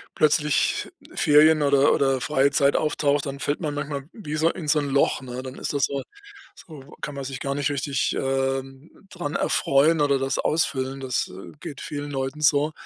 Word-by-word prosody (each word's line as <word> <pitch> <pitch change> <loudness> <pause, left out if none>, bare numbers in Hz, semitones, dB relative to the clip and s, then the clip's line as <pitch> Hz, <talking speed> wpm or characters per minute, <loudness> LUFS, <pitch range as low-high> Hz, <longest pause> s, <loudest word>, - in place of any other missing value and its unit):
plötzlich 150 -2 +2 0.2
Ferien 155 +1 +5
oder 140 -1 +4
oder 135 -2 +1
freie 140 +2 +2
Zeit 140 -1 +3
auftaucht, 145 -2 +1
dann 140 0 -5
fällt 145 - -1
man 150 -4 -3
manchmal 145 -1 -4
wie 155 -8 -5
so 165 +2 +3
in 155 -4 -5
so 150 - +4
'n 145 -1 -3
Loch, 135 0 +2
ne? 130 0 -7
Dann 130 0 -8
ist - - -4
das 140 - 0
so 140 -1 -3 0.5
so 145 -4 -13
kann 145 - -5
man 135 -1 -5
sich 135 0 -6
gar 140 0 -2
nicht 145 0 0
richtig, 140 -1 -1
ähm, 135 +1 -2 0.2
dran 170 -5 -5
erfreuen 150 +4 +2
oder 140 -2 +3
das 135 0 -1
ausfüllen. 135 -3 -1
Das, 130 -2 -1
äh, 95 +1 -11
geht 140 - -8
vielen 145 0 -5
Leuten 135 +2 -3
so. 150 0 +3
140 Hz, 190 wpm, -24 LUFS, 135-150 Hz, 0.5 s, Ferien